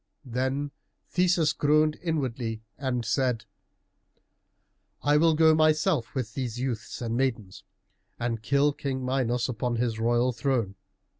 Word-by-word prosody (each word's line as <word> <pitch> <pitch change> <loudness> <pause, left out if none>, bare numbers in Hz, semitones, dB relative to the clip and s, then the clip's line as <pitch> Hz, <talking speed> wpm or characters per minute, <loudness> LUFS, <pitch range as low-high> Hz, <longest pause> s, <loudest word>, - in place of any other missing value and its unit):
Then 130 +3 -2 0.4
Theseus 175 -4 +2
groaned 150 +1 +2
inwardly 125 -9 -2
and 125 -4 -2
said, 125 0 0 1.6
"I 145 0 +4
will 160 +1 +4
go 160 0 +6
myself 155 -4 +2
with 120 -5 -3
these 125 -3 -4
youths 125 -2 -4
and 115 0 -2
maidens, 115 -7 -2 0.6
and 115 -2 -2
kill 140 +4 +2
King 130 -2 -3
Minos 125 -2 0
upon 120 -1 -2
his 115 -1 -1
royal 120 +2 +2
throne." 120 -4 -1
130 Hz, 125 wpm, -27 LUFS, 120-145 Hz, 1.6 s, go